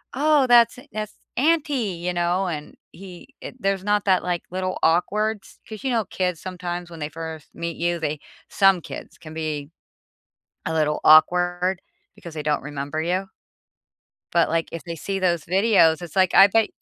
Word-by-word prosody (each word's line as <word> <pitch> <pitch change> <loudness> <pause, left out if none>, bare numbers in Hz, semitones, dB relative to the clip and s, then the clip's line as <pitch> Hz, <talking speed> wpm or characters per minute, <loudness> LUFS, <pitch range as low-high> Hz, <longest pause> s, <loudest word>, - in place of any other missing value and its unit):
“Oh 290 -1 +3
that's 240 0 +5
a - - -16
that's 215 -1 -5 0.2
auntie,” 285 - +1
you 175 +1 -3
know, 175 +2 0
and 150 -4 -5 0.2
he 185 -1 -12 0.2
eh, - - -6
there's 195 -3 -1
not 205 0 +1
that, 190 -2 +3
like, 175 -1 -1
little 185 0 -2
awkward 210 +6 +1
s - - -18
'cause 215 -2 -8
you 265 - -1
know 225 -4 +1
kids 180 -3 -2
sometimes 180 -1 -5
when 165 -1 -10
they 150 - -4
first 160 -1 -8
meet 170 -1 -5
you, 170 0 -1
they 150 -1 -3 0.3
some 195 -3 +4
kids - - -9
can 155 -1 -11
be 150 -3 -4 1.0
a - - -1
little 155 -1 0
awkward 175 +3 +4 0.3
because 170 - -11
they 155 - -4
don't 150 0 0
remember 145 +2 -4
you. 185 +3 -1 1.1
But, 170 - +4
like, 165 0 -1
if 165 - -6
they 170 -1 -6
see 195 +5 -3
those 175 -4 0
videos 180 -4 +3
it's 175 +1 -9
like 185 -1 +3
I 195 - +9
bet 225 +2 +2
180 Hz, 180 wpm, -23 LUFS, 165-195 Hz, 1.1 s, I